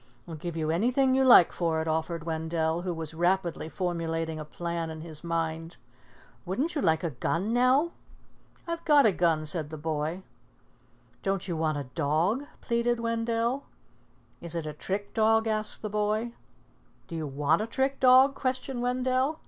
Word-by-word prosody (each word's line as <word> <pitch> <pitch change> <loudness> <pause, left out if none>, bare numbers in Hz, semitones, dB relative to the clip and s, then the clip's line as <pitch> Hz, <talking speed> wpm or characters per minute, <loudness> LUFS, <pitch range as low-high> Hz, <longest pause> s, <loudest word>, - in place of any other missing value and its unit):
"I'll 165 - -7
give 165 +2 -5
you 155 -1 0
anything 250 +9 +2
you 265 0 +3
like 240 -9 +8
for 165 -2 0
it," 160 - -2
offered 160 +1 -1
Wendell, 160 0 -1
who 180 0 -3
was 160 -2 -6
rapidly 175 -1 0
formulating 165 -3 -2
a - - -4
plan 170 +1 -4
in 160 0 -7
his 155 -1 -8
mind. 165 0 -3 0.7
"Wouldn't 260 - -2
you 295 - -1
like 160 -4 +2
a 170 - -1
gun, 170 - -1
now?" 255 +7 +3 0.7
"I've 335 -1 -4
got 295 -4 +5
a 215 - +6
gun," 165 -4 +1
said 155 -1 -2
the 155 - -7
boy. 155 +3 -3 1.0
"Don't 195 -1 -1
you 175 - -2
want 155 -2 0
a 145 - -3
dog?" 165 - +1 0.2
pleaded 235 0 0
Wendell. 230 +3 -1 0.8
"Is 170 0 -6
it 165 -2 -3
a 150 - -4
trick 195 +6 -4
dog?" 225 0 +3
asked 215 -1 0
the - - -1
boy. 210 +3 -1 0.7
"Do 170 - -7
you 160 -2 -3
want 145 +5 +1
a 220 - -2
trick 265 +3 -1
dog?" 260 +2 +6
questioned 260 -1 -3
Wendell. 255 +4 0
175 Hz, 170 wpm, -28 LUFS, 160-240 Hz, 1.0 s, like